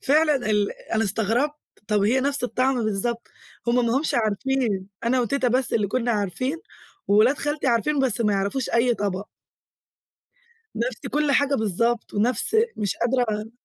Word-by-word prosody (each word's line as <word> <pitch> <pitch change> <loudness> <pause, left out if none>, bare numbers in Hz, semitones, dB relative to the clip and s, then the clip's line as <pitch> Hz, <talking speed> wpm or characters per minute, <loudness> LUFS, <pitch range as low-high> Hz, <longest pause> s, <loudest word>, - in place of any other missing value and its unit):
فعلًا 300 +1 +3
ال 205 -1 +1 0.2
أنا 225 0 +2
استغربت، 225 +9 0 0.3
طب 210 -1 +2
هي 245 +6 +3
نَفس 275 -2 0
الطعم 255 -1 0
بالضبط! 220 +3 -2 0.4
هُم 240 0 +2
ما 235 +3 +1
هُمش 310 - -2
عارفين، 220 -2 0 0.2
أنا 250 +2 +2
وتيتا 250 +2 0
بس 255 +1 0
اللي 210 -2 +2
كنا 240 +3 -1
عارفين، 220 - -2 0.5
وولاد 220 +8 +4
خالتي 295 -1 -2
عارفين 260 +5 +1
بس 250 -3 +1
ما 210 -2 +2
يعرفوش 200 +6 -1
أي 235 +1 +3
طبق. 200 -1 -3 1.5
نَفس 235 +1 -3
كل 295 0 +1
حاجة 285 0 +3
بالضبط 225 +2 -1
ونَفس 230 - +1 0.2
مش 205 -3 -1
قادرة 230 -3 -1
235 Hz, 150 wpm, -24 LUFS, 210-265 Hz, 1.5 s, وولاد